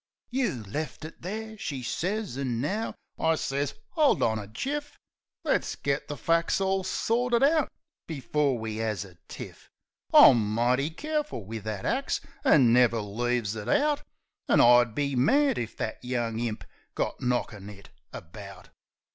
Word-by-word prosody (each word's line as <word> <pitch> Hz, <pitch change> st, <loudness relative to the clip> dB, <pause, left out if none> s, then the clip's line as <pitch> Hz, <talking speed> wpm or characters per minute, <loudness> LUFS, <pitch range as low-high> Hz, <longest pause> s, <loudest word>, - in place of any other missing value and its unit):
"You 235 Hz, -, -1 dB
left 150 Hz, +9 st, -5 dB
it 160 Hz, -, -11 dB
there," 220 Hz, +4 st, -5 dB
she 135 Hz, -8 st, -4 dB
sez, 195 Hz, -, -2 dB
"an' 130 Hz, -4 st, -2 dB
now 200 Hz, -, -2 dB
..." -, -, -55 dB
I 160 Hz, 0 st, +3 dB
sez, 140 Hz, -1 st, -2 dB
" -, -, -40 dB
'Old 305 Hz, -4 st, +4 dB
on 110 Hz, -1 st, +1 dB
a 100 Hz, -, -7 dB
jiff. 290 Hz, -, -4 dB, 0.5 s
Let's -, -, 0 dB
git 140 Hz, 0 st, -2 dB
the 145 Hz, -, -5 dB
fac's 165 Hz, +2 st, +1 dB
all 190 Hz, 0 st, +1 dB
sorted 235 Hz, +5 st, +1 dB
out 305 Hz, 0 st, +3 dB, 0.4 s
before 145 Hz, -2 st, 0 dB
we 110 Hz, -1 st, -4 dB
'as 105 Hz, -3 st, -2 dB
a 90 Hz, -3 st, -16 dB
tiff. -, -, -10 dB, 0.4 s
I'm 110 Hz, -4 st, +7 dB
mighty 125 Hz, +5 st, +2 dB
careful 300 Hz, -, -3 dB
wiv 110 Hz, +1 st, -6 dB
that 105 Hz, -3 st, -4 dB
axe, 265 Hz, +2 st, 0 dB, 0.2 s
an' 125 Hz, -6 st, +5 dB
never 120 Hz, -2 st, +4 dB
leaves 115 Hz, +1 st, -1 dB
it 105 Hz, -2 st, -5 dB
out. 295 Hz, 0 st, +2 dB, 0.5 s
An' -, -, +5 dB
I'd 120 Hz, -2 st, +6 dB
be 140 Hz, -2 st, 0 dB
mad 275 Hz, -, +3 dB
if 115 Hz, -2 st, -5 dB
that 110 Hz, -, -4 dB
young 120 Hz, -3 st, -2 dB
imp 115 Hz, -2 st, -3 dB, 0.3 s
got -, -, -2 dB
knockin' 115 Hz, -5 st, -2 dB
it 100 Hz, -1 st, -13 dB, 0.2 s
about." 95 Hz, +1 st, -10 dB
130 Hz, 160 wpm, -27 LUFS, -, 0.5 s, I'm